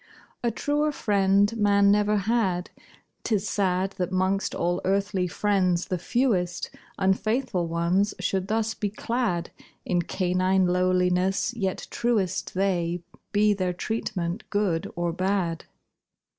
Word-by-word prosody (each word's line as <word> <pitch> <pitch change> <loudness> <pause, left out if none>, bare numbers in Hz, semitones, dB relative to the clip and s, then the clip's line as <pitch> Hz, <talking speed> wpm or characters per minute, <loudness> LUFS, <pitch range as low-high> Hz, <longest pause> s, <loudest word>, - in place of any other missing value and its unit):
A 240 - +2
truer 295 +6 0
friend 200 -3 +2
man 200 -1 +4
never 210 0 +3
had; 195 -4 0 0.5
'Tis 210 -2 0
sad 190 -1 0
That 180 0 -1
'mongst 190 +1 0
all 175 +1 0
earthly 195 -1 0
friends 185 -2 +1
the 185 - -1
fewest 180 -5 0 0.3
Unfaithful 195 -1 0
ones 170 +5 +1
should 190 -1 -1
thus 220 +1 0
be 210 -1 -2
clad 215 -5 -2 0.3
In 175 -1 +1
canine 185 +1 +1
lowliness; 180 +3 +1
yet 195 -6 -2
truest 210 -9 -1
They, 175 -3 0 0.3
be 210 0 +4
their 185 -2 -1
treatment 185 -1 -3
good 200 -6 0
or 175 -1 -1
bad. 185 -2 -1
190 Hz, 120 wpm, -26 LUFS, 180-210 Hz, 0.5 s, man